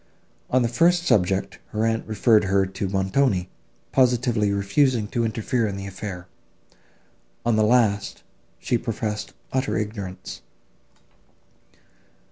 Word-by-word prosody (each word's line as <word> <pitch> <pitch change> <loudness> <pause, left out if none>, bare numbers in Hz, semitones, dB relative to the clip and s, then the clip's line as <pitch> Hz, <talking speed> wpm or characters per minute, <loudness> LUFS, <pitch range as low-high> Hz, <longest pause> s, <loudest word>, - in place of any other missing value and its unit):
On 130 0 +3
the - - +2
first 170 +9 +3
subject 95 - +1
her 110 +1 -1
aunt 115 0 -1
referred 110 0 +3
her 95 0 +2
to 95 +1 -4
Montoni, 95 0 +1 0.4
positively 120 -5 +2
refusing 105 +4 +1
to 120 - -1
interfere 115 +1 0
in 100 -1 -4
the 100 - -6
affair; 95 -2 -7 1.2
on 120 -1 +3
the 110 - +3
last, 105 -3 +2 0.3
she 120 - -1
professed 105 -3 -4 0.2
utter 130 +1 0
ignorance. 105 - -5
110 Hz, 115 wpm, -24 LUFS, 100-120 Hz, 1.2 s, On